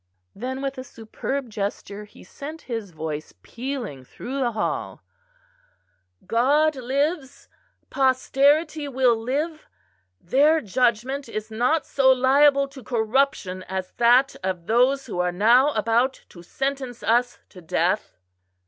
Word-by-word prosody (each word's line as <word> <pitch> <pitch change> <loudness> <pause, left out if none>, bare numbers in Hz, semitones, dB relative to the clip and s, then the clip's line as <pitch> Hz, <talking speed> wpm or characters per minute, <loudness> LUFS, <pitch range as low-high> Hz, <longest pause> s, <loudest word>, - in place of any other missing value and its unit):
Then, 260 +5 -5
with 275 -1 -3
a - - -5
superb 255 +3 -5
gesture, 205 0 -5
he 210 - -17
sent 295 - -9
his 225 -5 -5
voice 155 -2 -6
pealing 240 - -6
through 260 - -7
the 240 -3 0
hall: 215 - -3 1.2
"God 290 +6 +2
lives, 275 +2 -2 0.4
posterity 285 +4 +2
will 255 -3 +3
live; 290 +8 -3 0.5
their 290 - +3
judgment 250 +3 0
is 215 0 -5
not 250 +8 +1
so 265 -1 +3
liable 275 +2 +4
to 270 -2 -12
corruption 220 -4 0
as 190 -1 -4
that 245 +3 +4
of 185 -3 -3
those 255 +6 +2
who 195 -7 -5
are 180 0 +1
now 235 +10 +4
about 230 +4 +1
to 175 - -13
sentence 270 +5 -4
us 245 +2 +1
to 180 - -14
death." 175 +5 -1
250 Hz, 125 wpm, -24 LUFS, 215-275 Hz, 1.2 s, liable